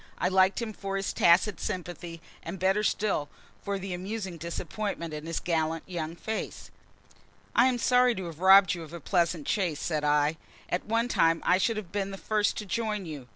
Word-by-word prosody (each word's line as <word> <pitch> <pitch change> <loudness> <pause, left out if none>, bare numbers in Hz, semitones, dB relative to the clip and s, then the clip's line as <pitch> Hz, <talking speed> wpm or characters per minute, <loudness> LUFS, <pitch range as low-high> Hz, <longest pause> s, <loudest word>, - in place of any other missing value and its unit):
I - - +1
liked 190 +1 +3
him 220 -2 -5
for 195 -1 -4
his 195 - -2
tacit 180 +4 +4
sympathy, 175 -3 -5 0.2
and 170 +4 -6
better 190 +3 +2
still 200 -8 0 0.3
for 200 0 -2
the 190 -1 -5
amusing 190 0 -5
disappointment 170 +1 -4
in 150 +1 -6
his 165 - -2
gallant, 160 -1 -1
young 165 -3 -4
face. 220 +5 -5 0.8
"I 240 +2 +6
am 255 -1 +1
sorry 250 0 +4
to 190 - -5
have 165 -2 -8
robbed 190 +1 +7
you 175 - -5
of 160 0 -10
a 170 - -6
pleasant 170 -2 0
chase," 175 -8 0
said 155 -3 -2
I. 150 +1 +2 0.3
"At 180 - -1
one 230 +2 +1
time 165 -8 +3
I 180 - +4
should 225 +3 +1
have 195 -5 -6
been 200 -1 -2
the 195 - -6
first 210 +1 0
to 210 - -4
join 210 -1 -2
you. 145 -6 -8
185 Hz, 200 wpm, -28 LUFS, 165-205 Hz, 0.8 s, robbed